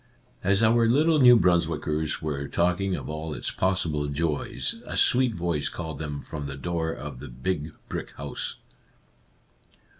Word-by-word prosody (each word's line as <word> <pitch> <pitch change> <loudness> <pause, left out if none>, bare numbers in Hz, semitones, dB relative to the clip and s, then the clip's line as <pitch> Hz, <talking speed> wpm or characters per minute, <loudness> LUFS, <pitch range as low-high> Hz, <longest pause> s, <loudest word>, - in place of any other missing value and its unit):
As 100 +3 +3
our 115 +1 +4
little 155 +6 +4
New 125 -2 +8
Brunswickers 80 -4 +1
were 70 -2 -2
talk 90 +2 +1
ing 95 -1 0
of - - -6
all 75 0 -4
its - - -2
possible 85 -6 0
joys, 75 +1 -2
a - - -4
sweet 125 -3 +4
voice 85 -4 -1
called 80 -5 -6
them 75 -3 -5
from 75 -2 -6
the 70 0 -6
door 80 +1 -2
of 60 - -7
the - - -8
big 75 +5 -3
brick - - -5
house. - - -4
85 Hz, 155 wpm, -26 LUFS, 75-95 Hz, -, New